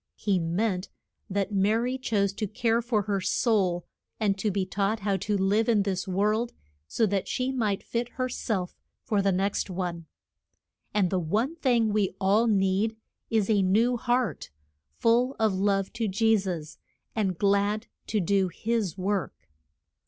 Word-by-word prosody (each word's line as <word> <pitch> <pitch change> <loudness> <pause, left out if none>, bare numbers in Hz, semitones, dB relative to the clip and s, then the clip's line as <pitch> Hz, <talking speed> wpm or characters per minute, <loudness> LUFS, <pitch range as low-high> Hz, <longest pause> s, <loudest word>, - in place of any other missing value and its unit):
He 200 -3 0
meant 180 +3 -1 0.4
that 200 +1 -1
Ma 200 +2 +3
ry 245 +3 0
chose 205 -6 0
to 210 +1 -3
care 230 +2 +1
for 230 -3 0
her 200 -1 -1
soul, 185 -5 +1 0.3
and 205 -3 +2
to 215 - +1
be 195 -1 -1
taught 200 +3 -1
how 200 0 +1
to 200 +2 -1
live 205 +4 +2
in 210 -3 +4
this 195 0 -2
world, 210 +5 0 0.3
so 230 - +1
that 200 -2 -1
she 255 +1 -1
might 215 -7 -1
fit 235 +1 -2
her 255 -1 -1
self 200 -7 -3 0.3
for 210 -5 +1
the 195 0 +2
next 195 +2 0
one. 175 -3 -4 0.8
And 195 -4 +1
the 190 - +1
one 215 - 0
thing 245 -8 +2
we 200 -3 +1
all 205 +5 +3
need 200 +1 +2 0.3
is 220 -3 +2
a 210 -3 +3
new 220 +6 +3
heart, 240 0 -1 0.5
full 240 +3 +3
of 220 -2 +2
love 195 0 0
to 230 -2 -1
Je 220 +3 +3
sus 175 -7 -4 0.4
and 195 -5 0
glad 205 +3 +1 0.2
to 215 - 0
do 195 +1 +2
his 210 0 -2
work. 190 - -3
205 Hz, 165 wpm, -27 LUFS, 190-225 Hz, 0.8 s, in